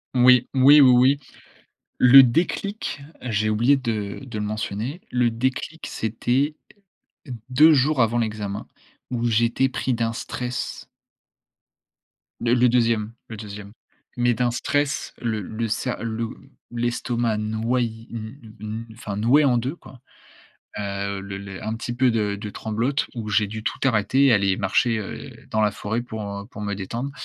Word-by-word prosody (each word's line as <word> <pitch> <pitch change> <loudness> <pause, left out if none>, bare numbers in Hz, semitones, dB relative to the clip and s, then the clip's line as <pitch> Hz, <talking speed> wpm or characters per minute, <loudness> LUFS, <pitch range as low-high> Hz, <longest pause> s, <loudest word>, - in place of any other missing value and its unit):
Oui. 125 0 +6
Oui, 140 +3 +8
oui, 130 - +8
oui. 130 +3 +5 0.8
Le 135 +2 +9
déclic, 170 - -1 0.2
j'ai 110 -3 0
oublié 120 +6 +4
de 110 -6 -3
de 120 -5 -6
le 105 - -2
mentionner. 110 - -4
Le 125 -1 +2
déclic, 130 +7 -3
c'était 125 +7 -1 0.9
2 150 +5 +6
jours 140 0 +3
avant 115 +1 +2
l'examen 105 -3 -3 0.4
où 120 -1 -1
j'étais 120 +3 +2
pris 130 -1 -1
d'un 115 -1 0
stress. 125 +1 -5 1.5
Le 120 0 +2
le 125 0 +4
2e, 115 -3 +1 0.2
le 110 - -7
2e. 105 -1 -9 0.4
Mais 120 0 +2
d'un 120 +1 0
stress, 145 +4 -1
le 110 -3 -1
le 110 +4 -4
sa 120 +4 -2
le 115 0 -3 0.4
l'estomac 120 -1 -1
noyé 115 +1 -2
n 110 0 -9
n 110 +2 -5
enfin, 105 -3 -6
noué 125 +8 +4
en 125 -3 +3
2 130 +7 -2
quoi. 130 -6 -15 0.8
Heu, 100 -1 -3
le 100 0 -6
le 100 -1 -8
un 110 +1 -2
petit 115 +1 -5
peu 130 0 +3
de 105 -2 0
de 105 -2 -5
tremblote 115 +8 -1
où 110 -2 -4
j'ai 105 0 +2
dû 110 +1 -7
tout - - -2
arrêter, 130 +3 +3
aller 100 -2 +3
marcher, 115 -3 +1
heu, 105 - -7 0.2
dans 110 - 0
la 105 -1 +2
forêt 110 +3 -3
pour, 110 -3 -6
heu, 100 0 -6
pour 105 -3 -9
me 100 -1 -2
détendre. 115 +8 -4
115 Hz, 155 wpm, -23 LUFS, 105-125 Hz, 1.5 s, Le